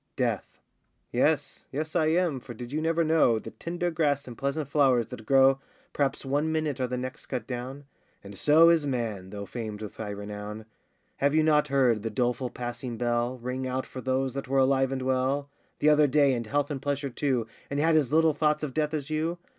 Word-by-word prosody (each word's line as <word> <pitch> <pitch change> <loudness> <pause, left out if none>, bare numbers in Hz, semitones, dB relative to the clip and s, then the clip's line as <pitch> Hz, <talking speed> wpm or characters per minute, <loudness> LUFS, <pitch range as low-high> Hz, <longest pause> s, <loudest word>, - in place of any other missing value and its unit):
DEATH. - - -2 0.5
Yes, - - 0
yes, 155 +4 -4
I 160 -3 +3
am, 165 -4 +1
for 120 -1 -10
did 120 +2 -8
you 155 +2 -1
never 165 +1 +1
know, 155 -8 +4
The 110 - -7
tender 175 +1 -3
grass 145 -4 0
and 120 - -8
pleasant 140 +3 -2
flowers 135 -5 +3
that 110 0 -9
grow 135 0 +5 0.3
Perhaps 140 -1 -1
one 145 +4 0
minute, 155 -3 -1
are 130 - 0
the 125 0 -3
next 130 +1 -6
cut 125 -5 -3
down? 130 +3 -6 0.4
And 100 0 -10
so 155 +8 +6
is 165 -3 +3
man, 110 -8 -3
though 100 0 -6
famed 110 -2 -6
with 105 - -8
high 110 -2 -5
renown. 105 +1 -6 0.5
Have 140 +2 +2
you 155 - +4
not 150 -1 +3
heard 130 -6 +2
the 115 - -3
doleful 125 +3 -1
passing 120 0 -5
bell 120 +1 0
Ring 125 +2 -4
out 130 +1 -2
for 130 - -8
those 130 0 0
that 135 -1 -5
were 135 +1 0
alive 135 0 +3
and 130 -1 -2
well 130 +2 0 0.3
The 150 - +3
other 150 0 +5
day, 140 -1 +4
in 120 -2 -2
health 145 +5 -1
and 135 -2 -4
pleasure 140 -1 -2
too, 130 -3 0 0.2
And 140 - -2
had 160 +2 +3
as 145 -5 +2
little 160 0 +4
thoughts 150 0 +1
of 140 -4 -3
death 155 +1 0
as 150 0 -4
you? 160 +3 -1
135 Hz, 210 wpm, -27 LUFS, 125-150 Hz, 0.5 s, so